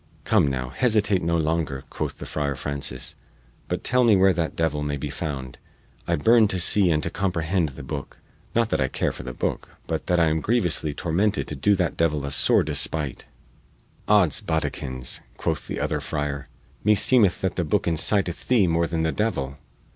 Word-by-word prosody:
"Come, - - +3
now, 65 -2 -2
hesitate 105 - +2
no 85 0 +1
longer," 80 -4 -1
quoth - - -4
the - - -7
Friar 70 -2 -2
Francis, 70 -2 -4 0.5
"but - - -3
tell 125 +1 +2
me 115 -3 +5
where 95 0 +5
that 85 -1 -2
devil 80 -3 0
may 75 0 -2
be 70 +1 -5
found 70 -4 -5 0.5
I - - +2
burn 110 +7 +5
to 95 -2 -1
see 95 +1 +5
and 75 -2 +1
to 85 - -2
comprehend 85 -3 0
the 70 +1 -10
booke 70 0 -6 0.4
not 115 -1 +2
that - - +1
I 65 - +2
care - - -1
for - - -9
the 65 - -6
booke, - - -3 0.2
but - - -3
that 90 -1 +2
I 85 -1 +4
am 80 0 0
grievously 90 -9 0
tormented 100 +5 0
to 75 - -3
do 100 +9 +3
that 90 -3 -1
devil 75 -3 +1
a 70 - -4
sore 70 - +3
despight!" 75 -5 -3 0.8
"Odds 100 -8 +4
boddikins," 65 -5 -2 0.2
quoth - - -1
the - - -4
other - - -1
friar, 75 -2 -4 0.3
"me 105 +1 +5
seemeth 105 -4 +4
that 95 -2 -1
the 90 - 0
booke 95 +5 0
inciteth 85 +2 0
thee 120 -6 +4
more 85 0 +1
than 80 -1 -1
the 80 - +1
devil." 70 -11 -2
80 Hz, 190 wpm, -24 LUFS, 70-95 Hz, 0.8 s, me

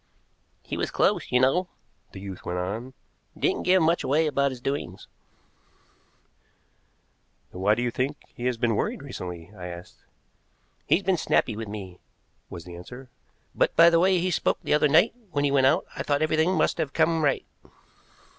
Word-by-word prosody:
"He - - -5
was - - -1
close, - - +1
you 125 - +4
know," 155 +9 +2 0.4
the - - -9
youth 95 -2 -8
went 90 - -3
on; 110 +8 -4 0.4
"didn't - - 0
give 185 -1 +4
much 165 +2 +2
away 150 +5 +2
about 140 -2 +1
his 130 -2 -8
doings." 140 +3 -4 2.4
"Then 90 - -8
why 105 +2 +4
do 120 - -2
you 120 - 0
think 135 +5 -2 0.2
he 120 - -7
has 125 -2 -1
been 115 -1 +1
worried 140 - -2
recently?" 90 -9 -7
I 90 -2 -7
asked. 85 0 -11 0.8
"He's 195 - +3
been 190 -1 +2
snappy 115 -7 +1
with 110 0 -6
me," 95 -4 -8 0.5
was 85 - -8
the 90 -1 -9
answer; 125 +9 -11 0.4
"but - - +1
by 170 +1 +7
the 165 - +4
way 185 +1 +4
he 180 +1 0
spoke - - +1
the - - 0
other 150 0 +4
night 160 +10 +4 0.2
when 145 - 0
he 140 - +1
went 135 -1 +4
out 160 +7 +2
I - - -4
thought 145 +1 0
everything 160 +4 +2
must - - +1
have 140 - -2
come 165 -1 +2
right." 140 -2 +1
135 Hz, 185 wpm, -26 LUFS, 105-160 Hz, 2.4 s, by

